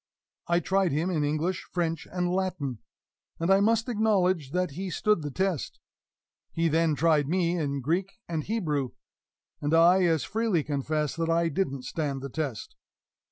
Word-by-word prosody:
I 170 Hz, 0 st, +3 dB
tried 190 Hz, 0 st, +1 dB
him 160 Hz, +6 st, 0 dB
in 155 Hz, -4 st, 0 dB
English, 155 Hz, +5 st, -1 dB
French 165 Hz, -3 st, -2 dB
and 180 Hz, -1 st, -1 dB
Latin, 175 Hz, -, -2 dB, 0.6 s
and 165 Hz, +3 st, +1 dB
I 195 Hz, -, +6 dB
must 225 Hz, +3 st, +2 dB
acknowledge 190 Hz, -, +1 dB
that 180 Hz, +2 st, -1 dB
he 185 Hz, +6 st, -5 dB
stood 210 Hz, +1 st, +1 dB
the 150 Hz, -, -4 dB
test; 185 Hz, +1 st, -2 dB, 0.7 s
he 165 Hz, 0 st, +1 dB
then 160 Hz, 0 st, +2 dB
tried 150 Hz, -2 st, +2 dB
me 175 Hz, 0 st, +1 dB
in 140 Hz, -4 st, -2 dB
Greek 175 Hz, +8 st, -1 dB
and 160 Hz, -3 st, -2 dB
Hebrew, 150 Hz, -, -1 dB, 0.7 s
and 145 Hz, +2 st, +1 dB
I 175 Hz, +3 st, +6 dB
as 160 Hz, -5 st, +2 dB
freely 220 Hz, -7 st, 0 dB
confess 150 Hz, +1 st, -1 dB
that 165 Hz, 0 st, -1 dB
I 165 Hz, 0 st, +2 dB
didn't 140 Hz, -6 st, -2 dB
stand 140 Hz, 0 st, -3 dB
the 140 Hz, -, -4 dB
test. 140 Hz, -5 st, -4 dB
165 Hz, 160 wpm, -27 LUFS, 150-185 Hz, 0.7 s, I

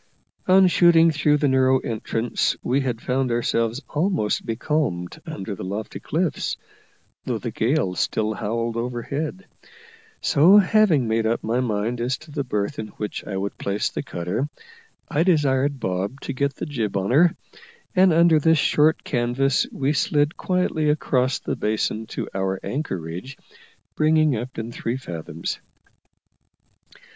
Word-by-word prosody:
On 190 Hz, +1 st, +6 dB
shooting 170 Hz, -2 st, +5 dB
through 150 Hz, -1 st, +2 dB
the 145 Hz, 0 st, +1 dB
narrow 130 Hz, 0 st, +4 dB
entrance 115 Hz, 0 st, -1 dB
we 135 Hz, +3 st, +1 dB
had 125 Hz, -4 st, -3 dB
found 130 Hz, 0 st, 0 dB
ourselves 115 Hz, +2 st, 0 dB
almost 155 Hz, -, 0 dB
becalmed 115 Hz, -, -2 dB
under 100 Hz, +2 st, -5 dB
the 95 Hz, -, -7 dB
lofty 100 Hz, +4 st, -5 dB
cliffs, 165 Hz, 0 st, -1 dB, 0.7 s
though -, -, -1 dB
the -, -, -5 dB
gale 115 Hz, -5 st, 0 dB
still 110 Hz, +4 st, 0 dB
howled 115 Hz, +2 st, -2 dB
overhead: 140 Hz, -, -4 dB, 0.7 s
so, 170 Hz, +8 st, +5 dB
having 195 Hz, -, +4 dB
made 110 Hz, 0 st, +1 dB
up 115 Hz, -, -1 dB
my 115 Hz, +3 st, 0 dB
mind 115 Hz, 0 st, -1 dB
as 125 Hz, +2 st, 0 dB
to 155 Hz, -1 st, -15 dB
the 145 Hz, -1 st, -2 dB
berth 105 Hz, -5 st, -2 dB
in 110 Hz, -, -4 dB
which 105 Hz, -, -4 dB
I 95 Hz, -, -3 dB
would 100 Hz, +1 st, -4 dB
place 100 Hz, +1 st, -1 dB
the -, -, -4 dB
cutter, 90 Hz, +12 st, -3 dB, 0.6 s
I 150 Hz, -, 0 dB
desired 145 Hz, -5 st, +2 dB
Bob 95 Hz, +7 st, -2 dB
to 140 Hz, -, -4 dB
get 140 Hz, +1 st, -1 dB
the -, -, -5 dB
jib 115 Hz, -10 st, -2 dB
on 95 Hz, +3 st, -1 dB
her, 165 Hz, +6 st, +5 dB, 0.6 s
and 185 Hz, 0 st, +6 dB
under 165 Hz, -1 st, +5 dB
this 160 Hz, +2 st, +4 dB
short 150 Hz, +2 st, +3 dB
canvas 125 Hz, +3 st, +1 dB
we 140 Hz, +2 st, 0 dB
slid 145 Hz, +1 st, +1 dB
quietly 180 Hz, -4 st, 0 dB
across 130 Hz, -3 st, +1 dB
the -, -, -4 dB
basin 110 Hz, +1 st, -1 dB
to -, -, -5 dB
our 95 Hz, 0 st, -1 dB
anchorage, 95 Hz, -, -5 dB, 0.6 s
bringing 155 Hz, -2 st, +3 dB
up 120 Hz, +3 st, -6 dB
in 115 Hz, +1 st, -4 dB
three 120 Hz, +1 st, -3 dB
fathoms. 85 Hz, -8 st, -5 dB
130 Hz, 150 wpm, -23 LUFS, 110-150 Hz, 0.7 s, On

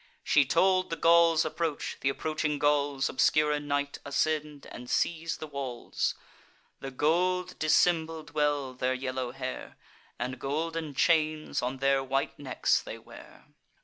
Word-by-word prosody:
She 145 Hz, -2 st, +4 dB
told 185 Hz, +5 st, +2 dB
the 165 Hz, -, -2 dB
Gauls' 165 Hz, -1 st, +4 dB
approach; 165 Hz, -3 st, -3 dB
th' -, -, 0 dB
approaching 150 Hz, +1 st, -2 dB
Gauls, 145 Hz, -2 st, +1 dB
Obscure 150 Hz, +3 st, +2 dB
in 145 Hz, 0 st, -2 dB
night, 145 Hz, 0 st, -1 dB
ascend, 150 Hz, 0 st, -1 dB
and 125 Hz, 0 st, -9 dB
seize 165 Hz, 0 st, 0 dB
the -, -, -6 dB
walls. 135 Hz, -5 st, -3 dB, 0.6 s
The 135 Hz, -, -6 dB
gold 175 Hz, +7 st, 0 dB
dissembled 160 Hz, 0 st, +2 dB
well 145 Hz, -3 st, 0 dB
their 130 Hz, 0 st, -1 dB
yellow 130 Hz, -1 st, -3 dB
hair, 130 Hz, 0 st, -6 dB, 0.4 s
And 125 Hz, +1 st, -4 dB
golden 155 Hz, +2 st, -3 dB
chains 155 Hz, 0 st, +1 dB
on 125 Hz, +2 st, -2 dB
their 135 Hz, 0 st, +2 dB
white 135 Hz, +1 st, -2 dB
necks 135 Hz, -3 st, +1 dB
they -, -, -8 dB
wear. -, -, -15 dB
150 Hz, 140 wpm, -29 LUFS, 135-160 Hz, 0.6 s, She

